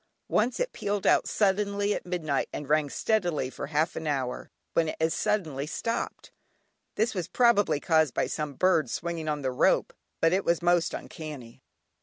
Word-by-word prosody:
Once 235 +4 +1
it - - -1
pealed 205 -1 -2
out - - +4
suddenly 200 0 +1
at - - -5
midnight 160 -6 -1
and 145 - -6
rang 150 0 +2
steadily 175 - 0
for - - -6
half 155 +3 0
an 160 - -4
hour, 135 -4 -2 0.2
when 165 -1 +2
it - - -4
as 160 0 +2
suddenly 160 -10 -1
stopped. 230 +8 -3 0.6
This 225 +4 +1
was 180 -5 -3
probably 205 - +3
caused 160 -5 +2
by - - +2
some 150 -3 -4
birds 165 -6 +2
swinging 170 -2 -3
on 150 -2 -2
the 130 - 0
rope, 125 - +2 0.3
but 165 +1 +3
it 190 +1 +2
was 170 -1 +2
most 175 -1 +2
uncanny. 145 -7 -8
165 Hz, 175 wpm, -28 LUFS, 150-200 Hz, 0.6 s, out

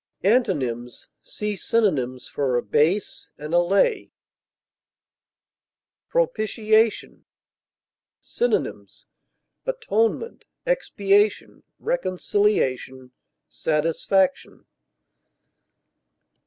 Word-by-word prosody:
Antonyms: 135 - 0
See 210 0 -4
synonyms 150 - 0
for 130 -4 -1
ABASE; 165 +10 0
ALLAY. 175 - +1 2.0
PROPITIATION. 220 - +1 0.9
Synonyms: 485 - -2 0.6
atonement, 460 - -1 0.2
expiation, 205 - +1 0.2
reconciliation, 185 - -1 0.4
satisfaction. 165 - 0
200 Hz, 45 wpm, -23 LUFS, 150-225 Hz, 2.0 s, ALLAY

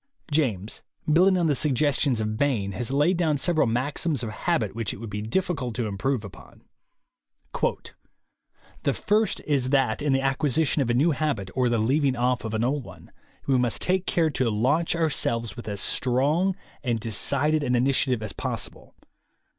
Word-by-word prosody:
James, 115 - -1 0.3
building 185 +3 +5
on 175 - +1
the 155 - +3
suggestions 140 -2 +1
of 110 0 -1
Bain, 110 -7 0
has 115 +4 -3
laid 150 +7 +2
down 160 -4 +1
several 155 -1 +2
maxims 135 +5 -1
of 110 - -4
habit 115 - -1
which 115 -2 -3
it - - -8
would 110 0 -8
be 105 +1 -3
difficult 135 - -2
to 120 -1 -1
improve 110 +3 -2
upon: 100 - -14 2.2
"The - - 0
first 215 +1 +1
is 135 -4 0
that 135 -3 +2
in 145 -1 +1
the 135 - +3
acquisition 140 +2 +1
of 125 - 0
a 120 - +2
new 150 +7 +3
habit, 135 -10 -2
or 125 -1 +1
the 120 - +1
leaving 135 +4 +2
off 125 +1 0
of 110 -1 -3
an 110 +2 +1
old 140 +2 -1
one, - - -14 0.3
we 135 -2 +2
must 120 -2 +1
take 185 0 0
care 160 -2 +2
to 130 -4 0
launch 135 +12 +1
ourselves 115 -9 0
with 120 - -9
as 100 -1 -3
strong 145 +9 +1 0.3
and 120 -4 0
de 110 +1 -5
cided 150 +8 +2
an 125 -3 +1
initiative 125 -2 +1
as 105 -3 -5
possible. - - -5
130 Hz, 180 wpm, -25 LUFS, 115-150 Hz, 2.2 s, building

